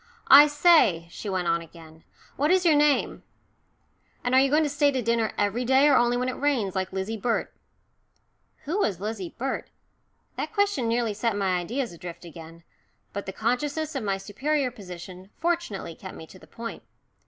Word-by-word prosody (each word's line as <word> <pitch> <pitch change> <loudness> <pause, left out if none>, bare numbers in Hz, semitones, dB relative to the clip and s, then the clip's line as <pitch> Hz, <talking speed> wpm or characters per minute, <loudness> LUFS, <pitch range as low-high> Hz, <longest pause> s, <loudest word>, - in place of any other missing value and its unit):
"I 285 +2 +10
say," 295 - +4
she 205 - -7
went 185 -2 -1
on 170 0 +1
again, 160 -1 -15 0.3
"what 290 +3 +1
is 370 0 +3
your 330 - +6
name? 295 -1 +2 1.0
And 245 - -1
are 260 - +7
you 275 - +3
going 305 +3 +3
to - - +1
stay 290 0 +2
to 265 -2 -1
dinner 230 -1 0
every 205 +4 0
day, 265 +3 +4
or 285 - +5
only 240 0 +3
when 250 +1 -1
it 255 - -4
rains, 250 -10 +1
like 190 -1 -2
Lizzie 195 +4 -3
Burt?" 235 +1 -1 1.1
Who 335 +8 -1
was 195 - 0
Lizzie 205 -3 -5
Burt? 265 +2 -3 0.7
That - - -4
question 405 - +1
nearly 230 -1 0
set 225 +1 -1
my 190 -2 +1
ideas 235 +5 -3
adrift 170 +1 -9
again. 165 0 -12 0.5
But 200 0 -5
the - - -3
consciousness 285 +9 -2
of 270 - -3
my 195 -2 -1
superior 260 +8 -1
position 185 -3 -10
fortunately 330 - -2
kept 190 +3 -10
me 160 - -9
to 185 - -15
the - - -17
point. 230 0 -8
230 Hz, 185 wpm, -26 LUFS, 190-285 Hz, 1.1 s, I